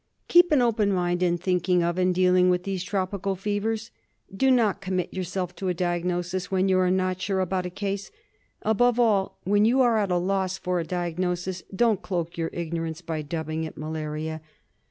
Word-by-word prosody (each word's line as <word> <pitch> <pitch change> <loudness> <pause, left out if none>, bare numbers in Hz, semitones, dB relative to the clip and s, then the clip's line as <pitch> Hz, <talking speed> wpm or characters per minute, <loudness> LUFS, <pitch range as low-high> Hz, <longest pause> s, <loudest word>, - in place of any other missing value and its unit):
Keep 350 0 +6
an 280 -5 +4
open 215 -4 +2
mind 175 -1 0
in 175 -1 +2
thinking 180 0 +1
of 170 +1 0
and 185 0 +3
dealing 180 0 +4
with 180 0 +1
these 190 -2 -3
tropical 195 0 -2
fevers. 210 +3 -2 0.4
Do 265 +7 +3
not 220 -6 +3
commit 185 -2 -2
yourself 180 -1 -3
to 190 - -3
a 180 - 0
diagnosis 175 +1 -2
when 190 0 +1
you 185 -1 +3
are 185 -1 +3
not 185 0 0
sure 190 0 0
about 185 0 -1
a - - -5
case; 200 +1 -4 0.5
above 240 +3 +3
all, 210 -5 +2
when 205 +2 +3
you 240 +5 +3
are 235 -3 +4
at 200 -2 0
a 180 - +2
loss 190 +1 0
for 180 -1 -1
a - - -1
diagnosis 180 +1 -2
don't 220 -2 +2
cloak 170 -3 -3
your 165 -1 -2
ignorance 165 -1 -4
by 160 -2 -3
dubbing 160 +1 -3
it 160 - -7
malaria. 155 0 -4
185 Hz, 190 wpm, -26 LUFS, 175-195 Hz, 0.5 s, Keep